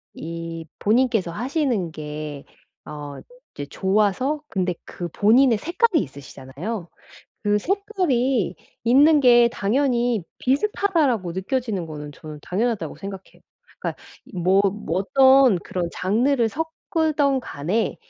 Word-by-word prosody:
이 165 0 -6 0.2
본인께서 220 -4 +2
하시는 240 - -1
게 150 -2 -7 0.4
어 145 -2 -8 0.4
이제 145 - -5
좋아서 210 - 0
근데 185 -3 -1
그 175 - -6
본인의 225 - +4
색깔이 345 - +1
있으시잖아요. 140 - -7 0.6
그 205 0 +3
색깔이 270 - 0 0.3
있는 290 +6 +6
게 240 -2 +6
당연히 240 - +1
'비슷하다.'라고 285 - +1
느껴지는 200 +1 -2
거는 150 -2 -7
저는 155 +1 -10
당연하다고 220 +5 -2
생각해요. 195 -1 -9 0.4
그러니까 - - -5 0.2
이 - - -13
뭐 185 +3 +3
뭐 190 -4 -3
어떤 265 0 +5
그런 175 -1 -3
장르를 235 +6 +1
섞든 310 0 0
간에 185 - -2
215 Hz, 270 characters per minute, -23 LUFS, 175-270 Hz, 0.6 s, 있는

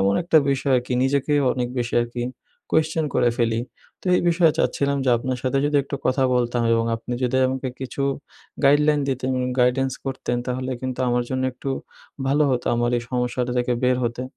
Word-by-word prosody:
এমন 100 +1 +3
একটা 165 -1 +2
বিষয় 135 0 +1
আরকি 125 +1 -5
নিজেকে 140 +2 +1 0.2
অনেক 125 -1 -2
বেশি 120 0 -2
আরকি 120 0 -5 0.5
কোয়েশ্চন 160 0 +1
করে 120 - +3
ফেলি। 115 -1 +1 0.4
তো - - -13
এই - - +2
বিষয়ে 165 -2 +4
চাচ্ছিলাম 140 0 +1
যে, 130 - +3
আপনার 130 +1 -3
সাথে 130 +1 +1
যদি 145 0 +1
একটু 140 +1 -5
কথা 130 +1 +2
বলতাম 120 -1 +1
এবং 115 0 +2
আপনি 120 +2 -7
যদি 125 +1 0
আমাকে 130 0 -3
কিছু 130 +1 -4 0.6
গাইডলাইন 150 +1 +4
দিতেন 130 0 -1
উন 125 - -1
গাইডেন্স 130 +1 +2
করতেন, 130 -2 -2
তাহলে 130 +1 -3
কিন্তু 130 0 -4
আমার 120 0 +1
জন্য 130 0 -1
একটু 135 +2 -5 0.6
ভালো 145 +2 +3
হতো, 125 -2 -1
আমার 120 0 +1
এই - - -6
সমস্যাটা 125 0 -1
থেকে 125 0 0
বের 125 0 +3
হতে। 120 +1 -2
130 Hz, 190 wpm, -23 LUFS, 120-140 Hz, 0.6 s, বিষয়ে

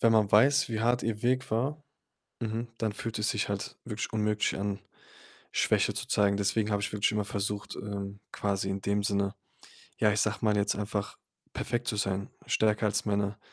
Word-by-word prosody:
wenn 115 -1 +5
man 105 -2 +4
weiß, 140 +6 +6
wie 110 -1 -1
hart 120 +1 +2
ihr 110 -2 -2
Weg 130 +1 +1
war, 135 +7 0 0.6
mhm, 115 +1 -2
dann 110 -2 0
fühlt 110 +1 -4
es 105 - +1
sich 105 -3 0
halt 100 0 -3
wirklich 110 -2 -4
unmöglich 105 -1 +1
an, 100 0 -2 0.7
Schwäche - - +3
zu - - -4
zeigen. 100 -1 +3
Deswegen 105 +2 +1
habe 100 - +1
ich 100 - -2
wirklich 105 0 +2
immer 105 -1 0
versucht, 100 0 -3
ähm, 100 0 -5
quasi 100 -1 -1
in 95 0 -1
dem 100 +1 +1
Sinne, 100 -1 0 0.6
ja, 105 -1 +4
ich 100 - +1
sage 105 0 +1
mal 105 -2 +3
jetzt 100 0 +2
einfach 105 0 -3 0.4
perfekt 120 +1 -2
zu 105 - 0
sein, 100 -1 -1 0.2
stärker 110 0 +2
als 105 - +1
meine 100 0 0
105 Hz, 190 wpm, -30 LUFS, 100-110 Hz, 0.7 s, weiß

